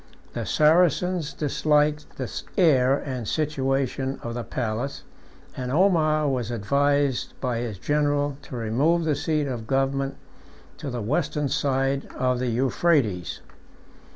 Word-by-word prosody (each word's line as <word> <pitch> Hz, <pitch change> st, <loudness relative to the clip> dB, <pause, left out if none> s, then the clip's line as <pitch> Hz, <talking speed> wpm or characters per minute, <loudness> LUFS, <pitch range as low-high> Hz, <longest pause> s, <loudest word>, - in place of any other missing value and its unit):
The -, -, -4 dB
Saracens 170 Hz, +1 st, +3 dB
disliked 150 Hz, 0 st, 0 dB
the 130 Hz, -, -3 dB, 0.3 s
air 135 Hz, -7 st, +4 dB
and 130 Hz, -6 st, -5 dB
situation 135 Hz, -2 st, -1 dB
of 115 Hz, -, -4 dB
the 120 Hz, 0 st, -4 dB
place, 120 Hz, +4 st, -3 dB, 0.5 s
and 125 Hz, -1 st, -4 dB
Omar 155 Hz, -3 st, +3 dB
was 125 Hz, -5 st, -1 dB
advised 140 Hz, +4 st, 0 dB
by 125 Hz, -3 st, -1 dB
his 115 Hz, -4 st, -4 dB
general 145 Hz, +4 st, 0 dB
to -, -, -9 dB
remove 135 Hz, +10 st, +1 dB
the 155 Hz, -2 st, +1 dB
seat 150 Hz, +1 st, 0 dB
of 120 Hz, -5 st, -5 dB
government 135 Hz, +1 st, 0 dB, 0.6 s
to 150 Hz, -, -5 dB
the 120 Hz, -3 st, -4 dB
western 150 Hz, +3 st, 0 dB
side 135 Hz, 0 st, 0 dB
of 125 Hz, -1 st, 0 dB
the 125 Hz, -, -1 dB
Euphrates. 120 Hz, -, +1 dB
135 Hz, 125 wpm, -25 LUFS, 125-150 Hz, 0.6 s, air